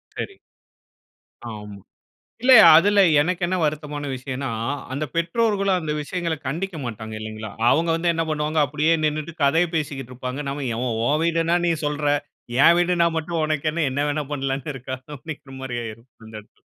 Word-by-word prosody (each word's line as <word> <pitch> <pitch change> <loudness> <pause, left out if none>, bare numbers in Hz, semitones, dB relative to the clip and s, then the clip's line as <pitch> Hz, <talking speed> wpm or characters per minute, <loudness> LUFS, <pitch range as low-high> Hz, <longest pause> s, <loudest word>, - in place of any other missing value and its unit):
சரி. 395 - -5 1.1
ஆமா. 105 -2 -8 0.7
இல்ல 260 - +6 0.2
அதுல 200 +4 +5 0.2
எனக்கு 175 +3 -1
என்ன 185 - 0
வருத்தமான 150 -1 -2
விஷயன்னா, 130 +1 -4 0.4
அந்த 145 +3 -2
பெற்றோர்களும் 195 +2 +1
அந்த 155 -2 -3
விஷயங்கள 170 +2 -2
கண்டிக்க 170 +6 -3
மாட்டாங்க, 110 -2 -6
இல்லைங்களா? 110 0 -6 0.2
அவங்க 165 +1 +2
வந்து 170 +1 +1
என்ன 165 0 0
பண்ணுவாங்க, 155 +1 -1
அப்படியே 150 +3 +1
நின்னுட்டு 155 +2 -2
கதைய 165 +5 +3
பேசிக்கிட்டு 140 -5 -4
இருப்பாங்க. 130 +3 -5
நம்ம 140 0 -3
எவ 120 - -3 0.2
உன் 150 +4 +2
வீடுன்னா 165 0 +2
நீ 170 - +3
சொல்றா. 145 0 +1 0.5
என் 170 - +8
வீடுன்னா 175 -1 +3
மட்டும் 165 +1 -3
உனக்கு 155 0 -1
என்ன 165 0 0
என்ன 135 - -1
வேணா 145 0 -1
பண்ணலாம்ன்னு 135 0 -3
இருக்கா 130 0 -5 0.2
அப்படிங்கிற 145 -1 -9
மாரி 125 -2 -4
ஆயிரும். 115 +3 -9 0.2
அந்த 110 0 -13
இடத்துல. 105 - -26
150 Hz, 155 wpm, -23 LUFS, 135-170 Hz, 1.1 s, என்